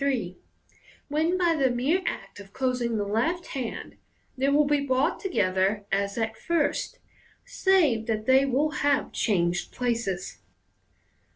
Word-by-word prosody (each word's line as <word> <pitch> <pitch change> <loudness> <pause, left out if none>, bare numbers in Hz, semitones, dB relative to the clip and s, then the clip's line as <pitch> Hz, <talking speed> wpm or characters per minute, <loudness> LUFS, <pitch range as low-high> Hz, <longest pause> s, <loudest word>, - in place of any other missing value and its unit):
3), 245 -10 -1 0.7
when 320 +5 +1
by 345 -2 +2
the 270 -4 +2
mere 265 +10 +1
act - - -5
of 200 0 -13
closing 250 -3 -1
the 205 - -1
left 245 - -1
hand 255 -4 -5 0.4
they 270 +1 +1
will 290 +1 +4
be 290 0 +2
brought 265 0 +1
together 200 - 0
as 200 +1 -1
at 225 -1 -1
first, 325 +4 -1 0.5
save 360 - +2
that 215 -1 -1
they 260 +2 +5
will 275 +3 +1
have 285 -2 0
changed 180 -4 0
places. 230 -7 -2
255 Hz, 135 wpm, -26 LUFS, 215-290 Hz, 0.7 s, they